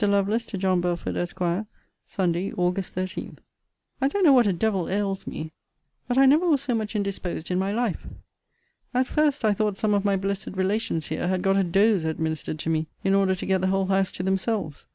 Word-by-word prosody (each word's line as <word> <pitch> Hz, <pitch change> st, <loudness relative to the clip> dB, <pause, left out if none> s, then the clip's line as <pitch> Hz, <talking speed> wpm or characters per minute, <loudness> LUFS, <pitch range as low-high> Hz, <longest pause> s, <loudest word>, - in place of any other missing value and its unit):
LOVELACE, 200 Hz, +3 st, +1 dB
TO 200 Hz, -, -5 dB
JOHN 185 Hz, -1 st, +1 dB
BELFORD, 175 Hz, -1 st, -2 dB
ESQ. 175 Hz, +3 st, -2 dB, 0.4 s
SUNDAY, 180 Hz, 0 st, -1 dB
AUG. 180 Hz, +2 st, +1 dB
13. 185 Hz, 0 st, -5 dB, 0.6 s
I 270 Hz, -, +4 dB
don't 390 Hz, +8 st, 0 dB
know 300 Hz, -5 st, +7 dB
what 245 Hz, -4 st, +5 dB
a -, -, +3 dB
devil 190 Hz, 0 st, 0 dB
ails 195 Hz, 0 st, -2 dB
me; 155 Hz, 0 st, -5 dB, 0.6 s
but 245 Hz, +1 st, -1 dB
I 270 Hz, -, +7 dB
never 305 Hz, +7 st, +5 dB
was 295 Hz, -5 st, +3 dB
so 275 Hz, -3 st, -1 dB
much 220 Hz, -1 st, -2 dB
indisposed 190 Hz, -4 st, -3 dB
in 180 Hz, -, +1 dB
my 195 Hz, +1 st, 0 dB
life. 230 Hz, -2 st, -2 dB, 0.9 s
At 255 Hz, +1 st, +3 dB
first, 290 Hz, -3 st, +1 dB
I 210 Hz, -, +4 dB
thought 210 Hz, -1 st, -1 dB
some 215 Hz, -1 st, +1 dB
of 200 Hz, -1 st, +2 dB
my 200 Hz, -1 st, +2 dB
blessed 195 Hz, +1 st, -2 dB
relations 190 Hz, -4 st, -1 dB
here -, -, -2 dB
had 185 Hz, 0 st, 0 dB
got 195 Hz, 0 st, +3 dB
a 195 Hz, -, +3 dB
dose 195 Hz, +1 st, +3 dB
administered 160 Hz, -1 st, -2 dB
to 160 Hz, -, -4 dB
me, 160 Hz, 0 st, 0 dB, 0.2 s
in 195 Hz, -, +2 dB
order 195 Hz, -1 st, +3 dB
to 185 Hz, -, -6 dB
get 190 Hz, -1 st, +1 dB
the 190 Hz, -, +1 dB
whole 195 Hz, 0 st, +1 dB
house 190 Hz, 0 st, +1 dB
to 180 Hz, -, -4 dB
themselves. 190 Hz, -4 st, -2 dB
195 Hz, 210 wpm, -25 LUFS, 180-215 Hz, 0.9 s, know